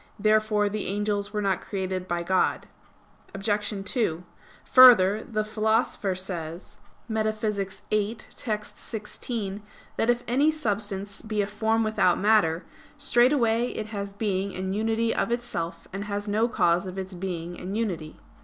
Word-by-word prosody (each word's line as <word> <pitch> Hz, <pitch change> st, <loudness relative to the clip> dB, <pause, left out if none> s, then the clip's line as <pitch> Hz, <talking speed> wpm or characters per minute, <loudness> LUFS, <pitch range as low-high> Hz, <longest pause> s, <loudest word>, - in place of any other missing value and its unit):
Therefore 215 Hz, 0 st, +3 dB
the 210 Hz, 0 st, -3 dB
angels 205 Hz, 0 st, -1 dB
were 210 Hz, -1 st, -2 dB
not 195 Hz, -1 st, +1 dB
created 185 Hz, -2 st, -3 dB
by 175 Hz, -1 st, -1 dB
God. 185 Hz, +2 st, +1 dB, 0.7 s
Obj. 205 Hz, 0 st, -1 dB
2: 190 Hz, -8 st, 0 dB, 0.4 s
Further, 220 Hz, -5 st, +7 dB
the 215 Hz, -2 st, 0 dB
Philosopher 215 Hz, -2 st, 0 dB
says 175 Hz, -2 st, -6 dB, 0.3 s
(Metaph. 215 Hz, -3 st, -2 dB
viii, 215 Hz, +1 st, 0 dB, 0.2 s
text. 210 Hz, -2 st, -4 dB
16) 210 Hz, -2 st, -5 dB, 0.4 s
that 225 Hz, -, +1 dB
if 240 Hz, 0 st, +2 dB
any 275 Hz, +6 st, +3 dB
substance 205 Hz, -8 st, -2 dB
be 215 Hz, -1 st, -1 dB
a -, -, -1 dB
form 220 Hz, +2 st, 0 dB
without 215 Hz, -5 st, +2 dB
matter, 200 Hz, -5 st, +3 dB, 0.3 s
"straightway 240 Hz, -3 st, +3 dB
it 215 Hz, -3 st, -5 dB
has 200 Hz, -1 st, -4 dB
being 200 Hz, -2 st, -2 dB
and 190 Hz, +1 st, -2 dB
unity 225 Hz, +1 st, +1 dB
of -, -, -1 dB
itself, 170 Hz, -9 st, -3 dB
and 200 Hz, +1 st, -4 dB
has 205 Hz, 0 st, -3 dB
no 215 Hz, +3 st, +2 dB
cause 180 Hz, -5 st, +2 dB
of 185 Hz, +1 st, -7 dB
its 190 Hz, 0 st, -5 dB
being 175 Hz, -1 st, -5 dB
and 190 Hz, +4 st, -4 dB
unity." 175 Hz, -9 st, -3 dB
205 Hz, 145 wpm, -26 LUFS, 190-220 Hz, 0.7 s, Further